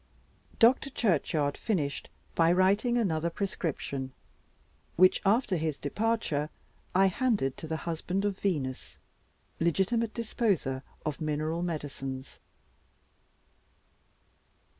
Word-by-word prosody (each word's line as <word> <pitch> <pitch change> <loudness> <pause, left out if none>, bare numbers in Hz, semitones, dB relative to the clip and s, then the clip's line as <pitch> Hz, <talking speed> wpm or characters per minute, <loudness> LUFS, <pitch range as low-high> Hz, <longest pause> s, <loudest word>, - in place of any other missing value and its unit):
Dr. 250 +4 +5
Churchyard 155 - +1
finished 155 -10 -2 0.2
by 165 0 +4
writing 200 +7 +3
another 170 -7 +1
prescription, 150 -8 -3 0.8
which, 185 +1 +5
after 205 -1 +3
his 155 -2 -1
departure, 155 -4 -1 0.5
I 190 +1 +6
handed 195 - +1
to 160 - -7
the 160 0 -2
husband 175 +4 -1
of 200 -2 -1
Venus, 145 -10 -2 0.6
legitimate 195 +7 +1
disposer 205 - 0 0.2
of 155 0 -3
mineral 155 +2 -1
medicines. 135 -5 -5
170 Hz, 95 wpm, -30 LUFS, 150-205 Hz, 0.8 s, I